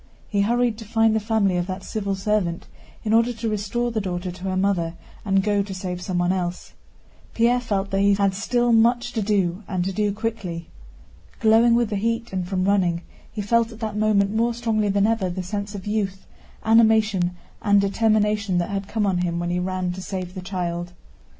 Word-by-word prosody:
He 200 -1 0
hurried 235 +1 +1
to - - -7
find 225 0 +2
the - - +3
family 210 -4 +1
of 175 0 -1
that 185 0 -5
civil 200 -2 -2
servant 190 -4 -1 0.4
in 220 -1 0
order 230 +2 +4
to 230 0 -4
restore 215 +3 -1
the 220 -2 -1
daughter 180 -1 -3
to 180 +1 -11
her 185 -1 -1
mother 180 -4 0 0.3
and 195 -2 +2
go 205 0 +2
to 200 -1 -5
save 180 -1 -4
someone 180 -1 0
else. 180 -1 -3 0.6
Pierre 240 +2 +3
felt 200 -5 -2
that 195 - +1
he 200 0 +4
had 195 -1 +2
still 240 +4 +1
much 240 +2 +3
to 225 - -1
do 195 -3 0
and 185 -3 -1
to 195 - -1
do 210 +1 +1
quickly. 200 -6 -4 0.7
Glowing 225 +2 +5
with 235 -2 +1
the 205 - 0
heat 230 +1 -2
and 185 -2 -2
from 185 -1 -1
running, 180 -4 +2 0.3
he 210 - -4
felt 230 +2 +2
at 225 - -12
that 215 -2 -3
moment 210 -1 +2
more 230 +1 +1
strongly 220 -3 0
than 200 0 +2
ever 220 -4 +1
the 180 +1 -4
sense 205 +2 -4
of 190 - -7
youth, 200 -3 -2 0.4
animation, 220 -5 +3 0.2
and 205 -1 +4
determination 210 -1 +1
that 175 +2 -1
had 195 0 -3
come 215 0 -1
on 190 -3 +1
him 175 -1 -1
when 175 0 -2
he 180 - 0
ran 185 0 -2
to 185 +1 -6
save 185 -2 -5
the 185 - -6
child. 175 -2 -4
200 Hz, 205 wpm, -23 LUFS, 185-220 Hz, 0.7 s, Glowing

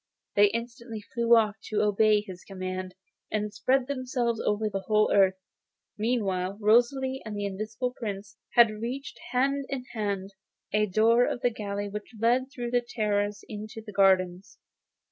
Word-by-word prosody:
They 205 0 +7
instantly 230 0 -5
flew 235 -1 +5
off 215 -2 +2
to 215 - 0
obey 210 0 +4
his 185 -3 -10
commands, 185 -1 -5 0.4
and 210 -1 -1
spread 255 +5 +2
themselves 250 -4 -1
over 210 +1 +1
the 195 -2 -3
whole 215 0 +3
earth. 190 -2 +5 0.6
Meantime 200 -4 -1
Rosalie 255 +5 +3
and 215 -2 -6
the 205 - -2
Invisible 215 +5 -3
Prince 210 -3 -6 0.2
had 235 -2 +7
reached, 260 +4 -5
hand 275 +2 +1
in 270 -2 -3
hand, 200 -3 -3 0.4
a 210 0 +3
door 225 +5 +4
of 240 - -3
the 245 - +2
gallery 205 -2 -4
which 210 +3 -7
led 245 +4 +2
through 240 -3 -5
a 245 - +4
terrace 210 -3 -1
into 215 +1 -7
the 215 -1 -10
gardens. 190 -2 +2
215 Hz, 155 wpm, -28 LUFS, 205-240 Hz, 0.6 s, They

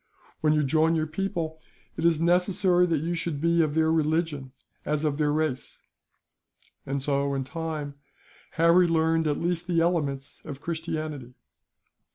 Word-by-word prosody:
When 155 -1 +3
you 150 -1 +2
join 160 +4 +2
your 155 -1 +1
people, 160 -1 -3 0.4
it - - -4
is 170 -1 +5
as 155 - -5
necessary 180 +1 +3
that 160 -3 0
you 170 +1 -1
should 165 -3 -3
be 170 +2 +3
of 155 -2 0
their 160 0 +3
religion, 155 -3 0 0.3
as 150 0 -1
of 150 -1 -1
their 150 -1 +2
race;" 150 -4 -2 1.1
and 135 0 -2
so, 140 0 0
in 135 - -1
time, 155 0 -5 0.6
Harry 170 +2 +5
learned 165 -1 +2
at 145 - 0
least 175 0 -2
the 170 -2 +2
elements 150 -6 -1
of 145 -3 -7
Christianity. 155 -5 -5
160 Hz, 160 wpm, -26 LUFS, 145-170 Hz, 1.1 s, is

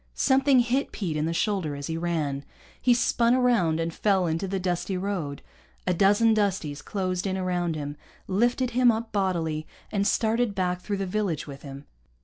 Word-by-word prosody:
Something 270 -1 +4
hit 250 +4 0
Pete 175 -7 -3
in 155 +1 0
the - - -1
shoulder 170 -4 -1
as 140 0 -6
he 160 - -3
ran. 160 -5 -2 0.4
He 250 - +3
spun 235 0 +3
around 230 -11 +2
and 165 0 -2
fell 195 -2 +2
into 165 +3 -1
the 190 0 -2
dusty 180 +1 -1
road. 180 -7 -3 0.4
A 180 - +2
dozen 205 +5 +4
Dusties 190 -9 -1
closed 185 -1 -2
in 190 0 -1
around 175 -3 -1
him, 145 -1 -5 0.3
lifted 240 +6 +1
him 245 0 +5
up 225 0 -4
bodily, 165 -6 -1 0.2
and 200 -1 +1
started 225 -1 +1
back 180 -1 -1
through 200 +1 -3
the 195 - -2
village 185 -5 -1
with 140 -2 -9
him. 140 0 -9
185 Hz, 180 wpm, -26 LUFS, 165-220 Hz, 0.4 s, him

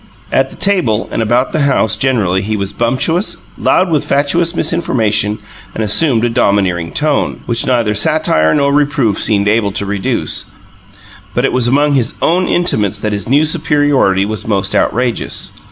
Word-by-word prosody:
At - - +1
the - - -13
table 175 - 0
and - - -2
about 120 +4 +1
the 155 - -1
house 110 -5 +1
generally 110 -7 0
he 105 +2 -3
was 100 0 -3
bumptious, 130 - 0 0.2
loud 185 -1 +1
with 150 -3 +1
fatuous 165 +5 0
misinformation, 110 -12 0 0.4
and 110 - -2
assumed 115 +2 +2
a - - 0
domineering 95 -6 0
tone, 150 -1 -1
which 120 +2 0
neither 120 -5 +1
satire 105 - +1
nor 140 -1 +1
reproof 140 -7 +1
seemed 100 -2 +1
able 105 -1 +1
to 100 - -2
reduce: 100 -1 -1 0.9
but - - +1
it - - -1
was 125 -2 +1
among 145 +3 +2
his 125 -4 0
own 180 +3 +1
intimates 110 - 0
that 105 -1 -3
his 100 +1 -4
new 145 +4 +3
superiority 145 - +1
was 110 -1 -5
most 100 -3 -1
outrageous. 120 0 -1
120 Hz, 165 wpm, -13 LUFS, 105-145 Hz, 0.9 s, new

